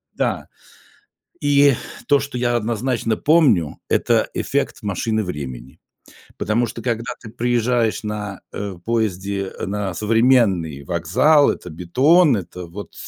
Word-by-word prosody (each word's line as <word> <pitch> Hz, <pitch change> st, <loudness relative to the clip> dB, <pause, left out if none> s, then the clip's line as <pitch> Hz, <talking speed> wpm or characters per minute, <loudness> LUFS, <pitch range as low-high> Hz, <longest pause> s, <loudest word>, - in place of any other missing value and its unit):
Да. -, -, -1 dB, 0.9 s
И 145 Hz, -1 st, +5 dB, 0.3 s
то, 145 Hz, -, +5 dB
что 140 Hz, -1 st, -5 dB
я 120 Hz, 0 st, +1 dB
однозначно 115 Hz, 0 st, -1 dB
помню- 140 Hz, -, +3 dB
это -, -, +2 dB
эффект -, -, -2 dB
машины 110 Hz, +2 st, -1 dB
времени, 65 Hz, -8 st, -7 dB, 0.6 s
потому 115 Hz, +3 st, +1 dB
что 115 Hz, 0 st, -7 dB
когда 115 Hz, 0 st, -2 dB
ты 115 Hz, -, -10 dB
приезжаешь 120 Hz, -1 st, 0 dB
на, 105 Hz, -2 st, -5 dB
э, 100 Hz, -2 st, -5 dB
поезде, 100 Hz, -4 st, -1 dB
э, -, -, -4 dB
на 100 Hz, -1 st, -3 dB
современный 105 Hz, -, +2 dB
вокзал, 90 Hz, -, +3 dB
это -, -, -8 dB
бетон, 130 Hz, -, +3 dB
это 90 Hz, 0 st, -7 dB
вот, 95 Hz, +5 st, -9 dB
110 Hz, 125 wpm, -20 LUFS, 95-125 Hz, 0.9 s, И